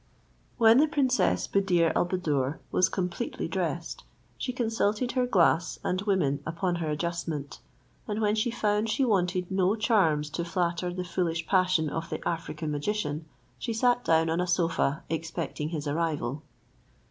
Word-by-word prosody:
When 230 +1 +6
the 305 - +5
princess 270 -4 +1
Buddir 180 -4 +2
al - - +2
Buddoor 150 -6 -1
was 185 +1 +3
completely 180 +5 -3
dressed, - - -3 0.3
she 255 - -3
consulted 225 -1 0
her 255 -1 +1
glass 175 -5 +3
and 185 +1 0
women 180 -9 +1
upon 170 +2 -1
her 165 -2 -2
adjustment; 160 -2 -3 0.5
and 210 0 -2
when 210 -1 +2
she 220 +2 +1
found 215 -2 0
she 265 +4 +2
wanted 185 -4 0
no 190 +2 +2
charms 165 -10 +2
to 170 +2 -2
flatter 175 +1 -1
the 180 +1 -4
foolish 170 -2 -1
passion 185 -3 +2
of 165 +3 -4
the - - -4
African 160 -2 -3
magician, 150 0 -2 0.3
she 230 - -3
sat 245 +2 +2
down 165 0 +3
on 165 +2 +1
a 180 - -1
sofa 165 -4 +1
expecting 160 -1 -3
his 155 -3 -4
arrival. 145 -3 -1
175 Hz, 155 wpm, -28 LUFS, 160-210 Hz, 0.5 s, When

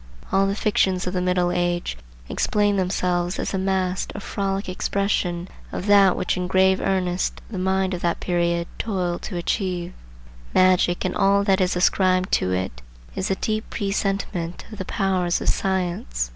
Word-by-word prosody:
All 195 0 +3
the 195 - 0
fictions 190 -4 +1
of 180 - -3
the 180 - 0
Middle 180 -1 +1
Age 175 - -1 0.3
explain 205 - +1
themselves 180 -1 0
as - - -3
a 190 - 0
masked 190 -1 -1
or - - -4
frolic 195 0 -2
expression 185 -2 -1 0.2
of - - -4
that 200 -2 +5
which - - 0
in 180 0 -2
grave 190 0 +3
earnest 185 -2 0
the 195 - -4
mind 190 0 +1
of 180 - -4
that 170 -1 0
period 170 -1 0
toiled 180 -5 -1
to 185 - -5
achieve. 180 -1 -2 0.6
Magic 185 -1 +4
and 185 - -1
all 200 +1 +3
that 195 -1 +2
is 180 -1 +1
ascribed 185 0 +2
to 90 - +2
it 90 -10 -2 0.3
is 190 - -2
a 195 - +2
deep 215 +2 -2
presentiment 195 -4 -2
of 215 - -9
the 190 - -3
powers 185 -3 0
of - - -1
science. 175 - -1
185 Hz, 170 wpm, -23 LUFS, 175-195 Hz, 0.6 s, that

